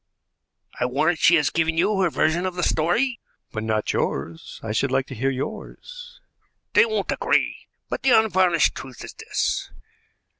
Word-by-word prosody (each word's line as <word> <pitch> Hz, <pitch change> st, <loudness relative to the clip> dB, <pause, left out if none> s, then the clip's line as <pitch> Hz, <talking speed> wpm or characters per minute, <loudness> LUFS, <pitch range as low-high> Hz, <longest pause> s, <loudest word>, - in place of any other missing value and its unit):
"I 125 Hz, -, +1 dB
warrant 155 Hz, +6 st, +1 dB
she 170 Hz, -, +6 dB
has 150 Hz, -4 st, +2 dB
given 160 Hz, 0 st, 0 dB
you 195 Hz, +3 st, +2 dB
her 185 Hz, -, +3 dB
version 165 Hz, +4 st, +1 dB
of 185 Hz, -, -5 dB
the 180 Hz, -, -2 dB
story." 230 Hz, +13 st, +1 dB, 0.3 s
"But 110 Hz, -, -4 dB
not 110 Hz, -1 st, -1 dB
yours. 80 Hz, +4 st, -3 dB
I 110 Hz, -, -4 dB
should 130 Hz, +6 st, 0 dB
like 135 Hz, 0 st, +1 dB
to 135 Hz, -, -9 dB
hear 135 Hz, +3 st, -1 dB
yours." 485 Hz, -, -7 dB, 0.5 s
"They 465 Hz, -, +6 dB
won't 440 Hz, -, -2 dB
agree; -, -, 0 dB, 0.2 s
but -, -, -4 dB
the 265 Hz, -, +2 dB
unvarnished 185 Hz, -6 st, +2 dB
truth 130 Hz, -2 st, -9 dB
is -, -, -9 dB
this. -, -, -2 dB
165 Hz, 165 wpm, -23 LUFS, 130-190 Hz, 0.5 s, she